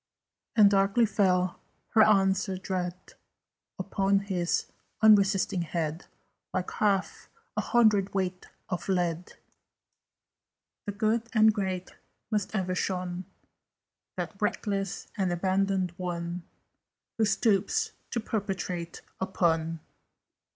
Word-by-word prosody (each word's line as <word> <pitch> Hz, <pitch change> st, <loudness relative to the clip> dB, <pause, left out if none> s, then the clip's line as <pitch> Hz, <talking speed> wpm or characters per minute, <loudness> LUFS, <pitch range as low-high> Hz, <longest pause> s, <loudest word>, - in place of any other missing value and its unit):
And 205 Hz, -3 st, +7 dB
darkly 200 Hz, +4 st, +4 dB
fell 185 Hz, -3 st, +1 dB, 0.3 s
her 220 Hz, -, +5 dB
answer 195 Hz, -2 st, +3 dB
dread 185 Hz, -1 st, -3 dB, 0.8 s
Upon 195 Hz, +1 st, +1 dB
his 180 Hz, -3 st, -1 dB, 0.4 s
unresisting 200 Hz, -3 st, +5 dB
head, 165 Hz, 0 st, -3 dB, 0.4 s
Like 185 Hz, -1 st, -2 dB
half 200 Hz, -2 st, 0 dB, 0.3 s
a -, -, +1 dB
hundredweight 195 Hz, -5 st, +2 dB, 0.2 s
of 180 Hz, 0 st, -4 dB
lead. 175 Hz, -2 st, -1 dB, 1.5 s
"The -, -, 0 dB
Good 220 Hz, +3 st, 0 dB
and 220 Hz, -1 st, +6 dB
Great 190 Hz, -3 st, -3 dB, 0.4 s
must 210 Hz, 0 st, -1 dB
ever 185 Hz, -2 st, 0 dB
shun 180 Hz, -1 st, -2 dB, 0.9 s
That -, -, -5 dB
reckless 195 Hz, -3 st, -1 dB
and 190 Hz, -3 st, +1 dB
abandoned 190 Hz, +1 st, +1 dB
one 175 Hz, -1 st, -4 dB, 0.7 s
Who 220 Hz, -, +4 dB
stoops 225 Hz, -, +1 dB, 0.2 s
to 235 Hz, -, -1 dB
perpetrate 190 Hz, -6 st, -4 dB, 0.2 s
a 190 Hz, -, -1 dB
pun. 165 Hz, -3 st, 0 dB
190 Hz, 100 wpm, -28 LUFS, 180-205 Hz, 1.5 s, And